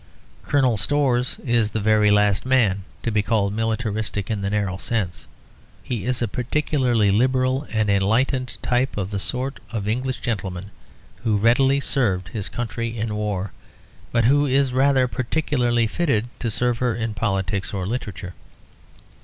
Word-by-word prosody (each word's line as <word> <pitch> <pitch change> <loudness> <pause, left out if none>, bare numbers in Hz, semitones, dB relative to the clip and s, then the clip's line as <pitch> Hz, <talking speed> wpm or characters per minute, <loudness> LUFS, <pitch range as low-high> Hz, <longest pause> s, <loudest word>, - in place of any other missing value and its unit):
Colonel 130 -6 +2
Storrs 130 -1 +1
is 115 -3 +2
the 110 - -2
very 105 0 +3
last 105 -1 +3
man 110 -8 +2 0.2
to 115 - -1
be 105 -1 +2
called 105 -2 0
militaristic 110 -1 -2
in 105 -2 -2
the 100 - -1
narrow 100 -2 -1
sense; 95 - -3 0.6
he 120 -3 -4
is 125 -1 +1
a - - 0
particularly 125 -3 +1
liberal 130 +5 +1
and 110 -1 0
enlightened 115 +6 +1
type 125 0 0
of 100 -1 -3
the 100 - -2
sort 130 +6 -3
of 110 -3 -4
English 125 +4 -1
gentleman 95 -3 -4 0.5
who 110 -2 +2
readily 130 +6 +3
served 100 -11 +1
his 100 +1 -3
country 115 -1 -4
in 110 0 -2
war, 105 -2 -2 0.6
but 115 -1 +2
who 145 +3 +4
is 135 -1 +2
rather 130 0 +3
particularly 125 -2 0
fitted 120 -4 0
to 115 - -1
serve 120 +2 0
her 125 -3 +1
in 115 -1 -3
politics 95 -3 -1
or 95 -3 -3
literature. 100 -5 -5
115 Hz, 155 wpm, -22 LUFS, 105-125 Hz, 0.6 s, who